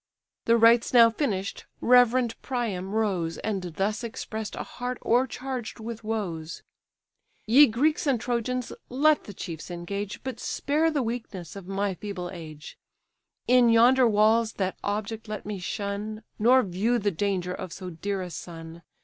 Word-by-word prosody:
The 230 0 +5
rites 230 +1 +5
now 230 -1 +8
finish'd, 205 -7 -2
reverend 245 -1 +4
Priam 210 -7 -3
rose, 185 -7 0
And 205 -3 -2
thus 210 +4 -1
express'd 220 -1 -5
a - - -4
heart 250 0 -5
o'ercharged 250 0 -1
with 225 0 -7
woes: 175 -8 -4 0.8
"Ye 270 +7 +7
Greeks 295 +8 +1
and 265 -4 +2
Trojans, 245 +1 -2 0.2
let 295 +4 +3
the 205 - -8
chiefs 165 -2 -7
engage, 195 +4 -5
But 260 -3 -5
spare 305 +6 0
the 295 -4 0
weakness 220 -8 -5
of 195 -2 -9
my 195 0 -1
feeble 180 -2 -6
age: 155 -4 -10 0.7
In 250 -1 +6
yonder 245 +3 +6
walls 220 +1 +3
that 190 -1 -2
object 215 +2 -3
let 215 -1 -5
me 205 -2 -4
shun, 205 +3 -4 0.2
Nor 250 +4 +5
view 205 +6 0
the 205 -2 0
danger 180 0 -1
of 185 -1 -6
so 185 0 -7
dear 195 +3 -3
a 180 - -7
son. 165 -1 -9
215 Hz, 150 wpm, -26 LUFS, 190-240 Hz, 0.8 s, now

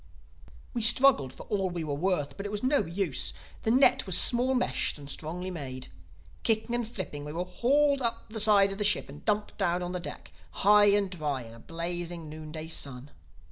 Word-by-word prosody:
"We 240 - -2
struggled 225 - +5
for - - -11
all 195 -3 -1
we 175 -2 -4
were 150 -2 -3
worth; 155 -1 -1
but 200 +1 -5
it - - -7
was 210 +1 -4
no 280 +3 +3
use. 170 -4 0 0.3
The - - -1
net 255 -1 +4
was 185 - +2
small 255 +2 +3
meshed 250 - 0
and 145 -1 -11
strongly 175 +6 -5
made. 130 -6 -6 0.5
Kicking 225 +1 0
and 240 -2 -1
flipping 185 -10 -6
we 150 +1 -7
were 175 +2 -2
hauled 280 +9 +2
up 230 -1 -2
the 220 0 -5
side 205 -2 +5
of 195 - -7
the - - 0
ship 210 -7 +2
and 145 +1 -12
dumped 210 -1 -1
down 180 -2 0
on 175 - -4
the 180 - -3
deck, 175 - -8 0.3
high 210 0 +7
and 200 -2 +3
dry 150 -7 -3
in 115 -1 -12
a 115 - -13
blazing 170 +2 -4
noon 155 0 -9
day 155 0 -6
sun. 140 -3 -3
185 Hz, 210 wpm, -28 LUFS, 155-215 Hz, 0.5 s, high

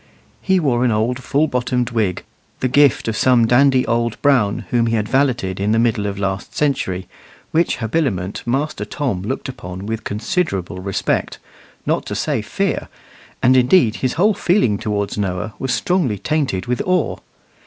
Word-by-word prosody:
He 190 -1 +2
wore 125 -7 +1
an 125 - +3
old 115 +4 0
full 145 +4 +1
bottomed 125 -3 -1
wig, 105 -6 -1 0.4
the 130 - +1
gift 140 -1 +3
of 110 - -1
some 120 0 +4
dandy 130 +2 +4
old 115 0 -1
Brown 125 -8 +2
whom 120 -1 +2
he 115 - +1
had 105 -1 -1
valeted 125 -9 0
in 105 +2 +1
the - - +3
middle 115 -3 +1
of 100 -1 -4
last 95 0 -3
century, 95 -11 -1 0.4
which 165 +1 +1
habiliment 110 - -1
Master 135 -2 -1
Tom 110 -3 -2
looked 115 +8 -4
upon 95 -7 -7
with 110 +1 -4
considerable 105 - -2
respect, 95 +1 -1 0.5
not - - 0
to - - -3
say - - -1
fear; - - -2 0.6
and 130 +2 +5
indeed 125 -2 +4
his 130 -1 -1
whole 205 +6 +3
feeling 170 - +1
towards 100 -1 -2
Noah 100 +2 -2
was 130 - -2
strongly 170 - +1
tainted 130 - -1
with 125 0 -1
awe. 185 -3 0
120 Hz, 165 wpm, -19 LUFS, 105-135 Hz, 0.6 s, and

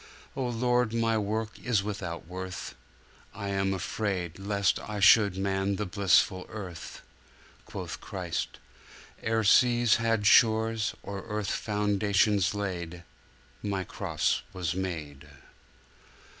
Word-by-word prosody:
O 130 -2 -1
Lord, 120 -1 +1
my 115 -1 +2
work 110 +1 -2
is 115 -5 +1
without 95 -6 -5
worth! 95 +1 -6 0.6
I 100 -2 -4
am 95 0 0
afraid, 95 -2 -2
Lest 100 -1 +1
I 105 -1 -5
should 100 -1 +6
man 95 0 0
the 105 - -2
blissful 95 -1 +2
Birth. 90 -6 -8 0.6
Quoth - - -6
Christ, - - -4 0.6
'Ere 110 0 +1
seas 120 +1 +5
had 115 -2 0
shores, 110 +1 +4
or 100 -1 -6
earth 105 -2 -2
Foundations 105 -1 +1
laid, 90 -4 -4 0.6
My 100 -2 -2
Cross - - -1
was 90 -4 -2
made! 75 -6 -5
100 Hz, 115 wpm, -28 LUFS, 95-110 Hz, 0.6 s, should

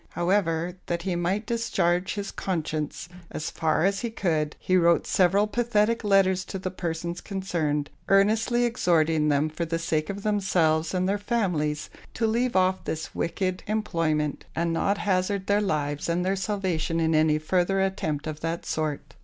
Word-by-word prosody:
However, 175 -1 0
that 170 -1 -2
he 185 -2 -1
might 185 +5 -1
discharge 190 -6 0
his 200 -1 -4
conscience 155 -3 -3 0.2
as 155 - -4
far 160 +1 +1
as 195 0 +1
he 235 - -2
could, 160 -8 -1
he 185 - 0
wrote 170 -1 +4
several 195 +3 +3
pathetic 230 0 +1
letters 195 -2 +3
to 195 - -5
the 185 0 -4
persons 170 -1 -4
concerned; 165 -7 -2 0.2
earnestly 220 +5 +3
exhorting 165 -9 +2
them 145 +1 +2
for 155 +2 -4
the 165 0 -1
sake 160 -2 -1
of 200 0 -5
themselves 180 -6 +1
and 185 0 +1
their 200 +1 0
families 180 -10 -1 0.2
to 225 - 0
leave 235 +2 +1
off 185 0 +2
this 160 0 -4
wicked 185 +2 -2
employment, 165 -8 -1
and 170 0 0
not 200 +4 +1
hazard 190 0 0
their 205 +1 +2
lives 145 -6 -1
and 175 +2 0
their 190 +1 +1
salvation 185 -5 -1
in 160 0 +2
any 155 0 +4
further 180 +4 +1
attempt 175 -6 -1
of 155 -1 -5
that 165 +1 -3
sort. 150 -3 -3
180 Hz, 165 wpm, -26 LUFS, 160-200 Hz, 0.2 s, wrote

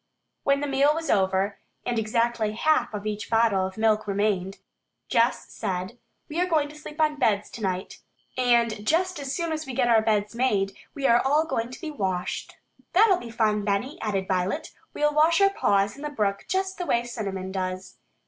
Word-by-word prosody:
When 280 0 +2
the 290 - -1
meal 280 +2 +3
was 325 0 -2
over, 190 +1 +1 0.3
and 240 -2 0
exactly 225 0 0
half 250 +1 +2
of 210 -1 -6
each 210 -1 -4
bottle 225 -5 +3
of 190 - -11
milk 220 -1 +2
remained, 195 -2 0 0.5
Jess 235 +2 +1
said, 190 +3 -4 0.3
"We 320 +3 -2
are 365 - +2
going 310 -4 +1
to 300 - -12
sleep 300 0 -10
on 305 -1 +2
beds 210 -6 +1
tonight, 190 -4 -4 0.4
and 235 -4 +2
just 350 +7 +1
as 275 -2 -4
soon 335 -2 -2
as 315 -1 -3
we 260 - -5
get 240 - +2
our 225 -2 +5
beds 210 -1 0
made, 210 -6 +1 0.2
we 275 - -3
are 235 -2 +5
all 295 +4 +3
going 230 -7 -2
to 255 - -9
be 320 -3 -5
washed." 190 -9 -3 0.4
"That'll 390 0 +5
be 240 - -8
fun, 215 -2 +1
Benny," 210 - -1
added 195 -3 -1
Violet. 185 0 -1 0.3
"We'll 295 0 +2
wash 320 +3 +4
our 395 0 +5
paws 200 - +1
in 280 - -12
the 300 - -3
brook 205 -8 -1
just 380 0 -1
the 355 - -3
way 235 - +2
Cinnamon 195 -6 -5
does." 185 0 -4
230 Hz, 195 wpm, -26 LUFS, 200-295 Hz, 0.5 s, our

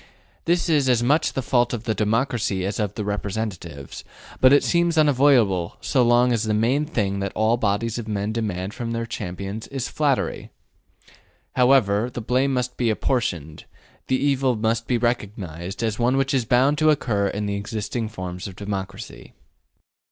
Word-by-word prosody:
This 175 +1 +1
is 145 -5 +2
as 120 -2 +3
much 145 +6 +2
the 135 - -2
fault 120 -1 +1
of 115 - -7
the 115 -2 0
democracy 110 -3 0
as 100 +1 -3
of 105 -2 -2
the 105 - -3
representatives, 100 -8 -5 0.4
but 130 - +6
it 145 - +5
seems 170 -1 +1
unavoidable 130 - +3
so 130 - +1
long 120 +1 +4
as 115 -2 0
the 110 -1 0
main 125 +7 +2
thing 100 -9 -1
that 100 -1 -2
all 110 +2 +3
bodies 115 +1 -1
of 110 - -7
men 105 0 -2
demand 100 -4 -3
of 115 -1 -3
their 115 0 -2
champions 100 -2 -6
is 135 -2 -4
flattery. 145 -4 -1 1.1
However 125 -4 +3
the 120 - -6
blame 130 +4 +1
may 125 - +1
be 120 -2 +1
apportioned, 90 - -2 0.4
the 130 - +2
evil 135 -3 +1
must 115 +1 -1
be 125 - +1
recognized 100 -5 -3
as 110 -1 -1
one 125 +3 +2
which 135 0 +1
is 130 -4 +1
bound 135 +6 +3
to 155 0 +4
occur 110 -9 +1
in 105 +1 -3
the 100 - -2
existing 110 +2 -3
forms 90 -3 -6
of 95 - -9
democracy. 100 - -6
115 Hz, 175 wpm, -23 LUFS, 100-130 Hz, 1.1 s, but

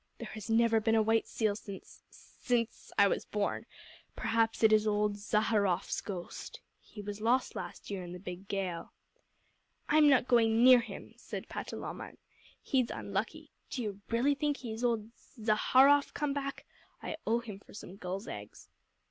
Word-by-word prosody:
There - - -7
has 215 0 -8
never 225 0 +4
been 225 +1 +2
a 220 - +4
white 225 +1 +2
seal 215 -3 0
since 200 -2 -10
since 240 -2 -3
I 200 - +7
was - - 0
born. 210 -1 -2 0.5
Perhaps 225 0 +1
it 220 -1 +7
is 215 0 +4
old 210 0 +1
Zaharrof's 205 -2 +1
ghost. 185 -4 -7 0.2
He 210 - -11
was 205 +1 -6
lost 245 +4 +2
last - - -7
year 195 -2 -3
in 175 - -8
the 180 - -6
big 180 +1 -8
gale." 190 -4 -3 1.0
"I'm 300 -1 +6
not 260 -2 +4
going 230 -2 +4
near 255 -1 +9
him," 235 - -8
said - - -7
Patalamon. - - -6 0.5
"He's 255 -3 +1
unlucky. 225 +11 -4 0.2
Do 250 - -3
you 205 -2 -5
really 245 +5 +3
think 290 0 -1
he 235 -3 -6
is 225 +3 -6
old 230 -2 0 0.3
Zaharrof 260 +6 +4
come 295 -2 0
back? 275 -1 -4 0.4
I 315 - -4
owe 230 +2 +2
him 210 -4 -8
for - - -16
some 195 -3 -9
gulls' 190 +3 -5
eggs." 105 0 -9
220 Hz, 165 wpm, -32 LUFS, 205-245 Hz, 1.0 s, near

